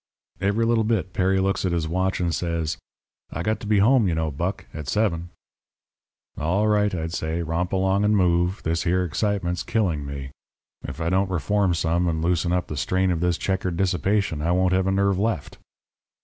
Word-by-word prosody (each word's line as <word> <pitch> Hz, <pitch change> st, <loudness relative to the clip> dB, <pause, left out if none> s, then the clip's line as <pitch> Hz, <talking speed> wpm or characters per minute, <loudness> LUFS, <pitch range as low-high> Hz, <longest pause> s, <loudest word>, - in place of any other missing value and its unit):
"Every 100 Hz, +4 st, +1 dB
little 115 Hz, -1 st, +2 dB
bit 105 Hz, -5 st, -1 dB
Perry 95 Hz, +1 st, +2 dB
looks 95 Hz, +1 st, 0 dB
at 90 Hz, -2 st, 0 dB
his 85 Hz, -2 st, -1 dB
watch 95 Hz, +3 st, 0 dB
and 85 Hz, -2 st, 0 dB
says: 85 Hz, -2 st, -2 dB, 0.5 s
"'I 85 Hz, -, -4 dB
got 110 Hz, +4 st, 0 dB
to 105 Hz, -, -8 dB
be 105 Hz, 0 st, +3 dB
home, 115 Hz, +2 st, +4 dB
you 85 Hz, -, 0 dB
know, 80 Hz, -1 st, -1 dB
Buck, 85 Hz, +8 st, -3 dB
at 75 Hz, -3 st, -7 dB
seven.' 90 Hz, -3 st, 0 dB, 1.1 s
"'All 90 Hz, +8 st, +1 dB
right,' 105 Hz, -2 st, +2 dB
I'd 80 Hz, 0 st, -4 dB
say. 80 Hz, 0 st, -2 dB
'Romp 85 Hz, +3 st, -2 dB
along 95 Hz, +1 st, +1 dB
and 105 Hz, 0 st, +3 dB
move. 90 Hz, +1 st, +1 dB
This 80 Hz, +1 st, 0 dB
here 90 Hz, +1 st, +1 dB
excitement's 90 Hz, 0 st, -1 dB
killing 90 Hz, -10 st, 0 dB
me. 70 Hz, -1 st, -6 dB, 0.5 s
If 70 Hz, +3 st, -7 dB
I 85 Hz, +1 st, -1 dB
don't 95 Hz, +1 st, +2 dB
reform 95 Hz, +1 st, +1 dB
some, 85 Hz, +2 st, +1 dB
and 80 Hz, -2 st, 0 dB
loosen 85 Hz, 0 st, +1 dB
up 90 Hz, 0 st, +1 dB
the 75 Hz, -, -6 dB
strain 95 Hz, +6 st, +1 dB
of 85 Hz, -, -1 dB
this 90 Hz, 0 st, +1 dB
checkered 95 Hz, -3 st, -2 dB
dissipation 95 Hz, -2 st, 0 dB
I 85 Hz, +3 st, +1 dB
won't 90 Hz, 0 st, +2 dB
have 95 Hz, 0 st, +2 dB
a -, -, +2 dB
nerve 100 Hz, -1 st, +2 dB
left.' 105 Hz, -8 st, -2 dB
90 Hz, 195 wpm, -24 LUFS, 85-100 Hz, 1.1 s, home